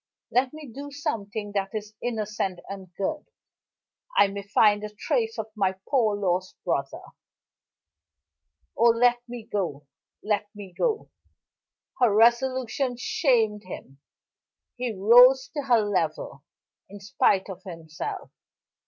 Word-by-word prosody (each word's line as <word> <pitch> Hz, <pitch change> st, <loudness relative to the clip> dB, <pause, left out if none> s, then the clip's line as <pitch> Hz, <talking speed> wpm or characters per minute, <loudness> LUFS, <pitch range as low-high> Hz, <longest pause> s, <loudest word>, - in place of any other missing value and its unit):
Let 255 Hz, +1 st, +2 dB
me 310 Hz, -1 st, -10 dB
do 280 Hz, +4 st, -8 dB
something 225 Hz, -8 st, -4 dB
that 200 Hz, +1 st, -2 dB
is 210 Hz, 0 st, -5 dB
innocent 210 Hz, -5 st, -2 dB
and 190 Hz, -2 st, -8 dB
good 295 Hz, +10 st, -2 dB, 0.9 s
I 200 Hz, -, +6 dB
may 200 Hz, 0 st, -5 dB
find 205 Hz, +1 st, +3 dB
a 210 Hz, -, -4 dB
trace 450 Hz, -, -1 dB
of 220 Hz, -, -5 dB
my 190 Hz, -3 st, +1 dB
poor 225 Hz, -7 st, +2 dB
lost 185 Hz, -2 st, -1 dB
brother. 140 Hz, -6 st, -2 dB, 1.7 s
Oh, 235 Hz, -, +5 dB
let 240 Hz, +1 st, +3 dB
me 240 Hz, -2 st, -7 dB
go! 160 Hz, -8 st, -3 dB, 0.4 s
Let 210 Hz, -1 st, -1 dB
me 200 Hz, -3 st, -10 dB
go!" 445 Hz, -3 st, -1 dB, 0.9 s
Her 245 Hz, -4 st, +5 dB
resolution 245 Hz, +3 st, +2 dB
shamed 225 Hz, -, +1 dB
him. 135 Hz, -6 st, -10 dB, 0.8 s
He 245 Hz, -1 st, -2 dB
rose 245 Hz, +6 st, +6 dB
to 290 Hz, -, -1 dB
her 240 Hz, -4 st, +4 dB
level, 165 Hz, -8 st, -2 dB, 0.5 s
in 205 Hz, +1 st, -10 dB
spite 195 Hz, -1 st, +1 dB
of 190 Hz, -2 st, -8 dB
himself. 165 Hz, -4 st, -7 dB
210 Hz, 125 wpm, -26 LUFS, 195-245 Hz, 1.7 s, I